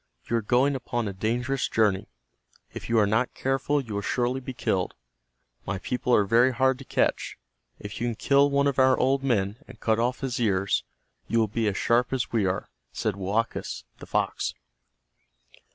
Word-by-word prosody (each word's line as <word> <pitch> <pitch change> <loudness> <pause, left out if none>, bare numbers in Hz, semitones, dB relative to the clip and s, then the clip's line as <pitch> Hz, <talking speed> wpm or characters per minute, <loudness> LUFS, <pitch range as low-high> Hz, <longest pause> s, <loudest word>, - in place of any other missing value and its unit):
You 115 - 0
are - - 0
going 125 +6 +2
upon 120 -3 -2
a 100 - -4
dangerous 120 +7 -1
journey. 105 -4 +1 0.7
If - - -7
you 115 - +2
are 105 - +5
not 110 +5 0
careful 135 +2 0
you 120 -6 -6
will 100 - -1
surely 125 +4 0
be 130 0 -6
killed. 95 -7 -1 0.7
My 100 - -3
people 125 +5 -2
are 105 - +4
very 120 +5 +4
hard 130 +1 +2
to - - -8
catch. - - 0 0.4
If 105 +2 -8
you 120 - +1
can 120 - -2
kill 140 +4 +3
one 140 0 +2
of 140 -1 +1
our 130 -1 +5
old 135 +1 +2
men, 105 -6 0
and 125 -3 -13
cut 110 0 +1
off 125 +2 0
his 130 -3 -2
ears, 100 -4 +1 0.4
you 115 - 0
will 110 -1 +3
be 110 +2 -1
as 100 - -1
sharp 120 +2 +2
as 130 -3 -1
we 110 -5 +2
are," 90 - -3 0.2
said 105 -3 -2
Woakus, 100 +4 -2 0.2
the - - -10
fox. - - -1
120 Hz, 190 wpm, -26 LUFS, 105-130 Hz, 0.7 s, are